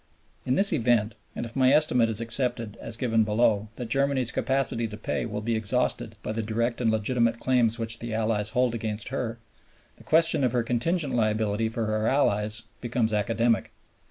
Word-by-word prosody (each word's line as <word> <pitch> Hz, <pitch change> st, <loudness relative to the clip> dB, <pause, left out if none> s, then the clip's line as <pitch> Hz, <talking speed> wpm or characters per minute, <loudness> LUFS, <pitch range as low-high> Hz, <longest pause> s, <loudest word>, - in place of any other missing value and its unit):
In 130 Hz, -, +2 dB
this 200 Hz, +2 st, +3 dB
event, 115 Hz, -5 st, +2 dB, 0.2 s
and -, -, -3 dB
if 115 Hz, -, -8 dB
my 130 Hz, -1 st, +4 dB
estimate 140 Hz, -6 st, +3 dB
is 110 Hz, 0 st, -2 dB
accepted, 115 Hz, -2 st, -2 dB
as 115 Hz, -, -5 dB
given 115 Hz, -3 st, +2 dB
below, 105 Hz, -1 st, +1 dB
that 120 Hz, -3 st, -6 dB
Germany's 135 Hz, -2 st, +1 dB
capacity 125 Hz, -2 st, 0 dB
to 105 Hz, -1 st, -8 dB
pay 110 Hz, -, -3 dB
will 105 Hz, -2 st, -4 dB
be 115 Hz, +1 st, -1 dB
exhausted 115 Hz, 0 st, 0 dB
by -, -, -3 dB
the 110 Hz, +1 st, -2 dB
direct 115 Hz, +3 st, -1 dB
and 115 Hz, -, +2 dB
legitimate 115 Hz, +2 st, +1 dB
claims 120 Hz, -3 st, +2 dB
which 115 Hz, 0 st, 0 dB
the 120 Hz, -1 st, -6 dB
Allies 110 Hz, -1 st, 0 dB
hold 125 Hz, 0 st, +1 dB
against 110 Hz, -2 st, -4 dB
her, 120 Hz, -3 st, -3 dB, 0.6 s
the -, -, -16 dB
question 165 Hz, -3 st, +3 dB
of 125 Hz, -2 st, +1 dB
her 120 Hz, -1 st, +1 dB
contingent 140 Hz, +6 st, 0 dB
liability 110 Hz, -1 st, 0 dB
for 115 Hz, 0 st, -3 dB
her 110 Hz, 0 st, 0 dB
allies 105 Hz, -5 st, +1 dB, 0.2 s
becomes 120 Hz, -2 st, -1 dB
academic. 115 Hz, +2 st, +1 dB
115 Hz, 185 wpm, -26 LUFS, 110-125 Hz, 0.6 s, my